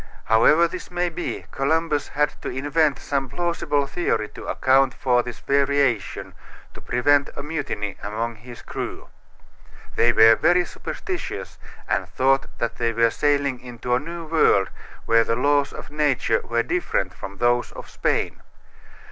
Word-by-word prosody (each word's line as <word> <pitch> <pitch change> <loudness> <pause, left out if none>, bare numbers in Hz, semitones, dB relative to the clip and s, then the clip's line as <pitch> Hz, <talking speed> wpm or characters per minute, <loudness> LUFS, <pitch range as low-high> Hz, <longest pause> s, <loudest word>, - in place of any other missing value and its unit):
However 150 +10 +5
this 180 +2 -8
may 175 0 -1
be, 170 +1 -5
Columbus 150 +1 0
had 150 +1 0
to - - -4
invent 145 +2 +1
some 135 -2 -2
plausible 150 -2 -1
theory 115 -9 -1
to - - -10
account 135 +1 +3
for 125 -2 +2
this 120 -1 -7
variation 140 -5 0 0.4
to - - -12
prevent 140 +3 +2
a 140 - -5
mutiny 145 -10 -4
among 110 +3 -3
his 120 +2 -12
crew. - - -6 0.9
They 120 - +4
were 115 0 +7
very 175 +8 +3
superstitious 370 - -6 0.3
and - - -1
thought 135 +1 +2
that 115 0 -3
they 115 -1 0
were 115 0 +3
sailing 140 -2 +1
into 125 0 -4
a 125 - +3
new 170 +3 -7
world 155 - +3 0.3
where 115 0 +4
the 115 - 0
laws 145 +2 +2
of - - -10
nature 145 -7 +1
were 115 0 0
different 95 - -1
from 100 0 -9
those 120 +2 +1
of - - -9
Spain. - - -1
135 Hz, 150 wpm, -23 LUFS, 115-150 Hz, 0.9 s, were